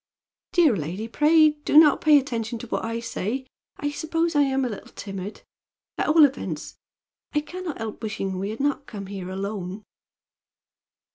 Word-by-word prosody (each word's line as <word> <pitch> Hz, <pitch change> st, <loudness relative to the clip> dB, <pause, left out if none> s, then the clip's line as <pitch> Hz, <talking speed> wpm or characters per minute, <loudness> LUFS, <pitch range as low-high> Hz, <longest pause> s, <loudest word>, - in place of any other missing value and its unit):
"Dear 325 Hz, -, +5 dB
lady, 180 Hz, +6 st, -4 dB
pray 305 Hz, +5 st, +5 dB
do -, -, +3 dB
not 310 Hz, -2 st, +7 dB
pay 310 Hz, -, +4 dB
any 290 Hz, -, +8 dB
attention 235 Hz, -3 st, -3 dB
to 245 Hz, -, -8 dB
what -, -, -2 dB
I 230 Hz, +1 st, -2 dB
say. 230 Hz, +2 st, -3 dB, 0.3 s
I 290 Hz, 0 st, -2 dB
suppose 330 Hz, +2 st, -1 dB
I 290 Hz, -, +5 dB
am 270 Hz, -1 st, +2 dB
a -, -, -1 dB
little 210 Hz, -, -8 dB
timid. 195 Hz, 0 st, -7 dB, 0.6 s
At -, -, +1 dB
all 305 Hz, 0 st, +7 dB
events, 275 Hz, -1 st, -4 dB, 0.6 s
I 295 Hz, -, +3 dB
can 365 Hz, +5 st, -8 dB
not 330 Hz, -, -4 dB
help 225 Hz, -1 st, -6 dB
wishing 195 Hz, -4 st, -3 dB
we 195 Hz, +2 st, -2 dB
had 220 Hz, -, -6 dB
not 280 Hz, 0 st, -1 dB
come 200 Hz, -3 st, -7 dB
here 190 Hz, -2 st, -6 dB
alone." 195 Hz, +1 st, -4 dB
235 Hz, 180 wpm, -25 LUFS, 200-295 Hz, 0.6 s, any